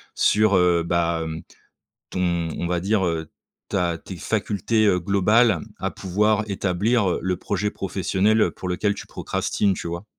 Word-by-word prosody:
sur, 105 -1 +3
heu, 90 -1 +3
bah, 85 -1 0
hem, 80 0 -6 0.7
ton 85 -2 -1
on 85 - -1
va 90 -1 0
dire, 100 -1 +1
heu, 80 -2 -2 0.4
ta 85 -4 0
tes 90 +1 -9
facultés, 110 +3 0
heu, 90 -2 +3
globales 100 +1 +3 0.2
à - - -2
pouvoir 105 +3 +1
établir, 100 +3 +1
heu, - - -1
le 90 0 -1
projet 105 +1 -2
professionnel, 95 +3 +1
heu, - - +3
pour 90 - -7
lequel 100 +3 0
tu - - -9
procrastines, 100 -2 -1
tu 85 - -5
vois? 85 +4 -5
95 Hz, 165 wpm, -23 LUFS, 85-105 Hz, 0.7 s, sur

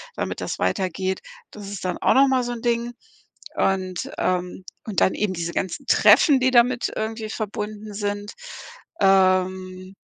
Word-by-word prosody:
damit - - -4
das - - -4
weitergeht. 185 - -1 0.3
Das 205 -2 -9
ist 200 -2 -7
dann 180 - -2
auch - - +3
noch 275 +1 +6
mal 260 -1 +2
so 245 - -3
'n 235 - -7
Ding 235 0 0 0.6
und, 185 -2 -1
ähm 180 0 -2 0.2
und 210 -4 -1
dann - - +3
eben 210 -2 -1
diese 170 -1 -4
ganzen 185 -3 -3
Treffen, 285 -5 +5
die 260 +1 +3
damit 245 0 +3
irgendwie 220 0 -4
verbunden 210 0 -5
sind. 205 0 -4 0.7
Ähm. 185 -1 +2
205 Hz, 155 wpm, -23 LUFS, 185-225 Hz, 0.7 s, noch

